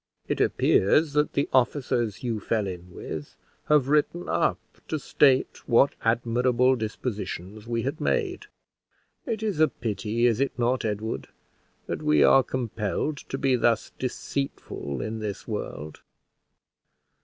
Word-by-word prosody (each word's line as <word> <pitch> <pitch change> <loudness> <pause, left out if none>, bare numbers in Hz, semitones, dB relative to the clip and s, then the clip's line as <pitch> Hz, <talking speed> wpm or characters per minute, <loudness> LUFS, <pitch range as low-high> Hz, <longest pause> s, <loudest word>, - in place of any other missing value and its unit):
It - - -1
appears 145 +10 +3
that 150 0 +1
the 140 - +1
officers 120 -4 +1
you 115 -3 -1
fell 110 0 0
in 90 -2 -7
with 80 -3 -7 0.3
have 150 -3 +4
written 150 +4 +1
up - - +1 0.3
to 155 - -1
state 135 -3 +2
what 125 +4 +5
admirable 125 +2 +2
dispositions 110 -2 -5
we 115 -1 -1
had 140 +4 -3
made. 425 -4 -1 0.8
It 220 -3 -2
is 205 -8 -1
a 155 - +6
pity, 115 0 -2
is 115 -1 +3
it 140 - 0
not, 125 +1 +1
Edward, 110 +1 -3 0.6
that - - -4
we 75 -1 +4
are 135 - +7
compelled 120 +3 -2
to 135 - -6
be 135 -1 +2
thus 120 -2 +1
deceitful 125 - -4
in 110 +1 -4
this 105 -2 -5
world? 80 - -5
120 Hz, 135 wpm, -26 LUFS, 110-140 Hz, 0.8 s, are